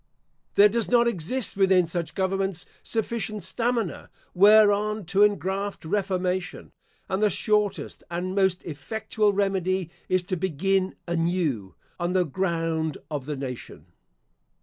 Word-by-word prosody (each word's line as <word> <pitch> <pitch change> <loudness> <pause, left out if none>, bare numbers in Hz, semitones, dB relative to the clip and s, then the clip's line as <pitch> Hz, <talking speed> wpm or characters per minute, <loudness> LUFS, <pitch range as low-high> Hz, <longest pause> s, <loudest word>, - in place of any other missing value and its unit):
There 205 - +8
does 225 +1 -1
not 240 -1 +4
exist 235 +4 -1
within 190 -2 +4
such 165 -2 -4
governments 190 -2 -1 0.2
sufficient 220 -3 -2
stamina 230 - -2 0.2
whereon 210 +1 +5
to 195 - +4
engraft 200 -2 +1
reformation; 185 -1 -2 0.4
and 190 +2 -1
the 210 - +4
shortest 210 0 0
and 175 +2 -3
most 190 -2 +1
effectual 210 - -1
remedy 190 -3 0 0.2
is 185 -1 +2
to 185 +1 -2
begin 190 +2 0
anew 165 - -1 0.2
on 175 +1 -1
the 185 -1 +3
ground 165 -2 -1
of 145 -3 -4
the 150 - -2
nation. 130 -3 -8
190 Hz, 125 wpm, -25 LUFS, 170-205 Hz, 0.4 s, There